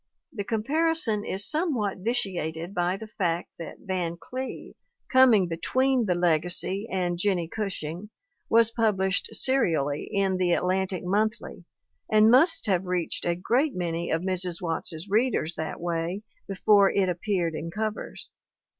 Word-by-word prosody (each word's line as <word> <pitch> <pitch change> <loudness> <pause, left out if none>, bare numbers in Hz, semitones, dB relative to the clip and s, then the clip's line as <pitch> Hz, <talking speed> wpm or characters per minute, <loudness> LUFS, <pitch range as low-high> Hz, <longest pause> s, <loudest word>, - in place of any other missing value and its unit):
The 205 -5 -3
comparison 240 0 +1
is 195 0 -1
somewhat 280 - -1
vitiated 185 -6 -2
by 180 +1 0
the 220 - -8
fact 175 -6 -2
that 165 - -7
Van 175 -3 -3
Cleve, 255 +8 -7 0.4
coming 245 -8 +6
between 250 +9 +1
The 180 - +2
Legacy 175 +4 0
and 175 -2 -1
Jennie 180 -3 0
Gushing, 190 -2 -5 0.4
was 230 0 +4
published 200 -5 0
serially 160 - +1
in 195 -1 +1
the 180 -1 +2
Atlantic 185 +1 0
Monthly 215 +4 -1 0.5
and 215 +1 +6
must 330 +7 +5
have 190 -2 0
reached 180 -2 -2
a 170 - +1
great 255 - +1
many 170 -1 -2
of 160 +2 0
Mrs. 185 -2 -1
Watts's 165 0 -3
readers 210 -5 +1
that 160 -1 -5
way 170 +3 -2 0.3
before 200 +1 +4
it 195 -2 +1
appeared 180 -2 -1
in 160 +1 -5
covers. 215 +4 -5
190 Hz, 135 wpm, -26 LUFS, 175-220 Hz, 0.5 s, coming